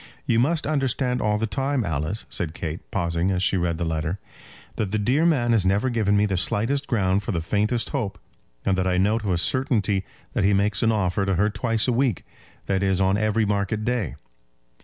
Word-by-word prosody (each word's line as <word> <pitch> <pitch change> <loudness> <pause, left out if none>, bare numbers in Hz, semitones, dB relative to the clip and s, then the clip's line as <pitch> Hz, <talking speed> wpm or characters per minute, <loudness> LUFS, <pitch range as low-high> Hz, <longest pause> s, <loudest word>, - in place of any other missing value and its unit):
"You 115 - +2
must 155 +6 +1
understand 135 -4 0
all 105 -1 +1
the 110 - 0
time, 135 +3 -1
Alice," 80 +4 -2
said 85 -2 -4
Kate, 80 0 -4
pausing 85 -1 0
as 95 -1 0
she 95 - +2
read 85 -2 0
the 85 - -2
letter, 80 +2 -2 0.6
"that 105 - -1
the 110 - 0
dear 130 +11 +2
man 125 -8 +2
has 110 -4 +4
never 100 +7 +1
given 105 -3 +2
me 105 - +3
the 95 -3 -1
slightest 115 +10 0
ground 100 -4 +1
for 110 - -4
the 85 - -1
faintest 105 +7 0
hope, 105 -9 -2 0.5
and 95 - +2
that 95 - +1
I 90 -1 +1
know 105 +5 +2
to 105 -4 -2
a 90 - +2
certainty 105 -2 +1 0.3
that - - 0
he 100 +1 +4
makes 100 0 +1
an 115 - +3
offer 100 -2 0
to 95 - +1
her 105 +4 +2
twice 110 +2 0
a 125 - +2
week, 125 -4 0 0.4
that 95 -1 0
is, 95 -1 +1
on 95 0 +3
every 110 +1 +1
market 105 +1 -1
day. 115 - -1
105 Hz, 215 wpm, -24 LUFS, 95-115 Hz, 0.6 s, has